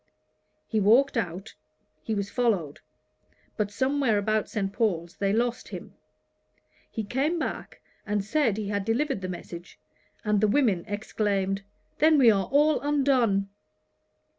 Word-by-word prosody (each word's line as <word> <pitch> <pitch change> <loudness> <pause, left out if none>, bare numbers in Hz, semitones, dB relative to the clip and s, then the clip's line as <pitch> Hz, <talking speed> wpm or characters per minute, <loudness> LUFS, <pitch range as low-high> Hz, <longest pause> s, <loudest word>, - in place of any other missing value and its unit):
He 220 - 0
walked 235 +8 +4
out; 195 -1 -3 0.5
he 220 +6 -3
was 200 -1 -3
followed; 200 - 0 0.8
but 210 -2 -1
somewhere 260 +1 +1
about 215 +1 0
St. 195 -3 -2
Paul's 175 -6 -1
they 195 -1 0
lost 240 +3 -1
him. - - -9 1.0
He 220 - -4
came 275 - 0
back, 320 - -5 0.2
and 205 -2 -2
said 230 -3 +1
he 210 -2 -3
had 205 -1 -1
delivered 235 +2 0
the 185 - -4
message, 175 -1 -8 0.5
and 210 -1 +2
the 215 - +4
women 205 -7 +2
exclaimed, 200 -2 -1 0.4
"Then 310 +1 +5
we 245 -5 +7
are 195 -2 +1
all 295 +2 +3
undone!" 260 -9 +2
215 Hz, 140 wpm, -27 LUFS, 195-255 Hz, 1.0 s, we